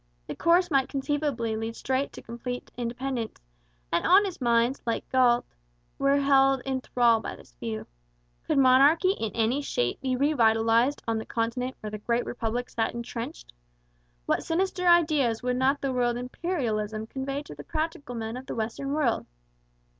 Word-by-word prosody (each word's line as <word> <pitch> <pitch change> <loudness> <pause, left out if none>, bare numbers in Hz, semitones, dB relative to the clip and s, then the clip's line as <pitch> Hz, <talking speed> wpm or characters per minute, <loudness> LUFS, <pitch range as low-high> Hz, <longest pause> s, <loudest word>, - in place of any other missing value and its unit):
The - - -6
course 345 +1 +3
might 270 -2 +2
conceivably 275 -5 -1
lead 225 +1 -4
straight 265 +1 -1
to - - -10
complete 245 +2 -6
independence, 245 0 -4 0.5
and - - +2
honest 380 -3 +4
minds, 235 +2 +2
like 230 - -2
Galt's, 245 -2 +3 0.4
were 275 +1 +3
held 270 -1 +4
in 265 0 -2
thrall 240 -3 +3
by - - -6
this - - -17
view. 220 -2 -4 0.6
Could - - +1
monarchy 275 +7 +5
in 225 - -3
any 235 +5 +1
shape 120 - -1
be 260 -1 0
re 285 +4 +2
vitalized 230 +2 +3
on 225 -1 0
the - - -5
continent 250 +3 -2
where 215 - -5
the 215 - -5
Great 235 +3 0
Republic 240 +1 -3
sat 225 0 -1
entrenched? 230 - -6 0.7
What - - +1
sinister 360 +2 0
ideas 305 -10 +3
would 250 0 0
not 270 +2 +2
the 275 -1 -1
word 240 -1 +1
Imperialism 235 - -2
convey 275 +4 -4
to - - -10
the 145 0 -10
practical 310 - -4
men 225 0 -4
of 260 - -9
the - - -4
western 235 +5 -3
world? 290 -6 0
250 Hz, 165 wpm, -27 LUFS, 230-280 Hz, 0.7 s, monarchy